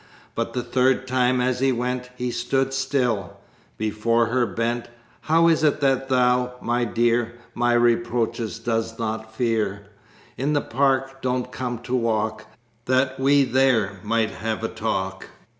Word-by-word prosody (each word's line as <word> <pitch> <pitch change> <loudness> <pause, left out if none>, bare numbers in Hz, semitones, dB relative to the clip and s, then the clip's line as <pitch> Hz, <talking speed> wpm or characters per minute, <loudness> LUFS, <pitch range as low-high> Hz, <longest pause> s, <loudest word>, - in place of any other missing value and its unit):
But - - -3
the 125 - -2
third 130 +2 +1
time 125 0 +2
as 125 0 0
he 135 0 +3
went 125 +1 -2
He 125 0 -3
stood 135 +3 0
still: 130 -7 -1 0.4
before 110 +2 +1
her 120 +1 +1
bent. 115 +4 -2 0.3
"How 165 +2 +3
is 160 -1 +3
it 150 -1 +3
that 135 -1 +1
thou, 125 -1 +2
my 120 0 0
dear, 120 +1 +1 0.2
My 120 0 +1
reproaches 120 -1 +1
dost 115 -1 -2
not 110 -1 -4
fear? 105 -4 -1 0.5
In 140 +3 0
the 145 - +2
park 135 +1 0
don't 125 0 -1
come 125 -2 -3
to 125 - -5
walk 110 -2 -1 0.4
That 130 +1 +1
we 140 +1 +4
there 125 -7 +2
might 110 0 +1
have 110 +2 -4
a 115 - -1
talk? 95 -3 -3
120 Hz, 150 wpm, -23 LUFS, 115-130 Hz, 0.5 s, we